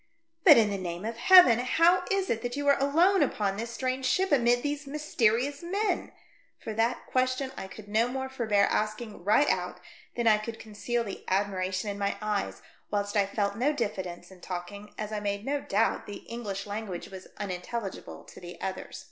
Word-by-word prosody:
'•' - - -43
But, 310 -6 +9
in 215 -3 +4
the 200 - -2
name 175 +1 -5
of 230 +1 -4
Heaven! 255 -4 +8
how 335 +8 +3
Is 390 -1 0
it 230 - -1
that 245 0 -3
you 285 0 -2
are 280 - +5
alone 340 +8 +4
upon 200 -2 0
this 230 +3 -4
strange 255 +2 -2
ship, 380 -1 +1
amid 245 -3 +3
these 290 0 -3
mysterious 275 -2 0
men 380 +2 -1 0.2
?" - - -35
for 220 - -4
that 230 +3 0
question 255 +1 0
I 190 - -6
could 210 +2 -12
no 220 +3 +2
more 265 +1 -3
forbear 220 -6 +1
asking 215 -2 -2
right 215 +9 +4
out - - -1 0.4
than 240 - -1
I 215 -1 +5
could 225 +1 -6
conceal 225 +2 -3
the 200 -4 -7
admiration 190 0 -1
in 200 0 -4
my 200 0 -1
eyes, 210 -1 -3 0.3
whilst 205 0 -2
I 200 -1 +3
felt 200 0 -1
no 275 +6 +2
diffidence 195 -9 -4
In 185 -1 -15
talking, 195 +3 -7
as 215 0 -4
I 215 - -2
made 200 +1 -3
no 285 +1 -1
doubt 220 -1 0
the 205 - -8
English 205 -4 -5
language 205 -4 -5
was 190 -1 -10
unintelligible 195 +2 -5
to - - -13
the 175 0 -10
others. 190 -1 -5
220 Hz, 200 wpm, -28 LUFS, 200-265 Hz, 0.4 s, But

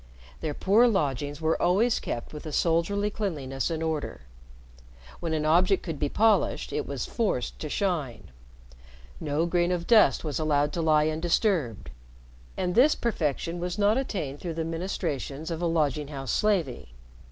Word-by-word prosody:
Their 150 - -3
poor 215 +6 +4
lodgings 145 - -1
were 160 0 +1
always 205 +7 +3
kept 120 - -5
with 150 +1 -8
a - - -5
soldierly 175 +7 +1
cleanliness 145 -11 -3
and 165 -1 -2
order. 160 - -3 1.0
When 165 - -3
an 155 -1 0
object 180 +5 +3
could 160 -5 -5
be 145 - 0
polished 220 +4 +2
it - - -2
was - - -3
forced 205 - -2
to 155 - -5
shine, 145 - -2 0.9
no 155 +1 0
grain 175 0 +1
of 175 -1 -1
dust 215 -12 +5
was 150 -5 -2
allowed 145 -2 +1
to 170 - -1
lie 155 -1 +3
undisturbed, 160 - 0 0.7
and 180 -1 -1
this 265 +9 +5
perfection 165 - -2
was 180 +2 -3
not 210 +1 +3
attained 180 - -3
through 170 -3 -5
the 165 -1 -2
ministrations 165 -3 -3
of 165 0 -3
a 175 - +1
lodging 150 -3 0
house 135 -3 -5
slavey. 175 - 0
165 Hz, 160 wpm, -27 LUFS, 145-190 Hz, 1.0 s, dust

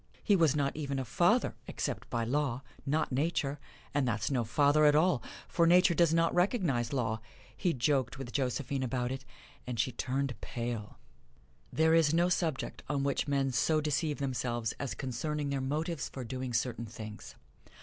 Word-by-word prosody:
He 205 - +4
was 160 -5 +4
not 140 -2 0
even 140 -3 -3
a 135 - -2
father, - - +2
except - - -4
by 115 - -1
law 135 +1 -1 0.2
not 150 +2 +1
Nature 145 0 0 0.3
and 140 -3 +1
that's 110 +2 -1
no 125 -3 +1
father 145 +6 +4
at 150 0 +6
all, 155 -4 +3 0.3
for 170 -1 +2
Nature 180 +1 +6
does 170 -1 +4
not 165 0 +3
recognize 175 - +1
law. 115 -5 -1 0.3
He 180 - +1
joked 135 -1 +1
with 130 -3 -6
Josephine 135 +1 -1
about 125 -1 -1
it, 130 0 -5 0.4
and 120 -3 -4
she 130 - +2
turned 135 +2 -1
pale. 115 -3 -4 0.7
There 160 +1 +3
is 165 -1 +4
no 175 +1 +3
subject 165 -6 -1
on 140 -1 0
which 140 +1 0
men 135 -1 +1
so 155 +6 +2
deceive 150 0 0
themselves 120 -4 -2
as 130 -6 -3
concerning 140 +3 -3
their 135 -1 -1
motives 150 +1 -2
for 130 - -6
doing 130 +1 -4
certain 120 0 -1
things. 110 -1 -9
140 Hz, 170 wpm, -31 LUFS, 125-155 Hz, 0.7 s, at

